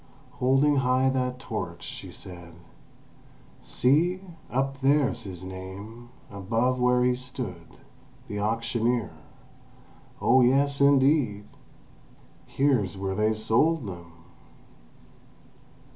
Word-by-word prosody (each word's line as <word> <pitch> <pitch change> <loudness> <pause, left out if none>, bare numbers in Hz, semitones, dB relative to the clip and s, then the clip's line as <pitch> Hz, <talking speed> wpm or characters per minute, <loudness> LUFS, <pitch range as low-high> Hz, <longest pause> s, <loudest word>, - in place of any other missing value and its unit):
Holding 135 +3 +3
high 130 0 +2
that 125 -1 -1
torch, 130 - -6
she - - -8
said: 85 -2 -11 1.1
"See! 165 +8 +2 0.3
Up 135 +1 -2
there's 140 -2 +2
his 95 -2 -8
name, 95 +6 -9 0.2
above 115 +6 0
where 125 0 +3
he 125 0 +3
stood. 125 -9 -7 0.5
The 105 - -4
auctioneer. 115 +2 0 1.1
Oh 130 +2 +4
yes, 140 +3 +3
indeed! 135 -6 +3 1.0
Here's 125 -9 +1
where 95 0 -2
they 105 +2 +1
sold 115 +8 +1
them!" 85 -4 -8
125 Hz, 95 wpm, -26 LUFS, 105-135 Hz, 1.1 s, Oh